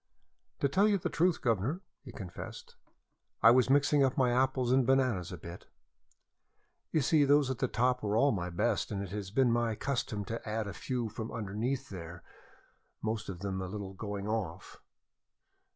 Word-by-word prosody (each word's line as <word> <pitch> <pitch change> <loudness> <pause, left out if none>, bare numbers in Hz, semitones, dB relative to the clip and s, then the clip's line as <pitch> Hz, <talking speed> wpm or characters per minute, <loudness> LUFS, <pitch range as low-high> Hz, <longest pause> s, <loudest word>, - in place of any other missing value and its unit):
"To - - +4
tell 190 +9 +3
you 205 -2 +3
the 180 - -3
truth, 175 +1 +1
guvnor," 120 - 0 0.2
he 130 - -9
confessed, 95 -6 -9 0.7
"I 115 - +9
was 130 +1 +4
mixing 145 +1 +4
up 130 -1 +1
my 125 -2 +3
apples 130 0 +1
and 130 0 +5
bananas 130 -9 +1
a - - -6
bit. - - -10 1.2
You 155 - +2
see, 150 +3 +4
those 140 -1 +4
at 130 - -4
the 130 - +1
top 125 +1 +1
were 105 0 0
all 140 +4 +4
the 90 -4 -2
best, 105 +7 0
and 100 -2 -3
it 95 - -8
has 100 -2 -4
been 125 +3 +3
my 115 -1 +1
custom 115 -5 -2
to 115 -1 -5
add 110 0 -1
a 100 - -5
few 125 0 -3
from 110 +1 -6
underneath 115 +5 -3
there 85 -2 -8 0.8
most 110 -1 -2
of 90 -2 -6
them 95 -1 -3
a 95 - -4
little 95 0 -6
going 100 0 -5
off. 95 -5 -4
115 Hz, 185 wpm, -31 LUFS, 100-130 Hz, 1.2 s, I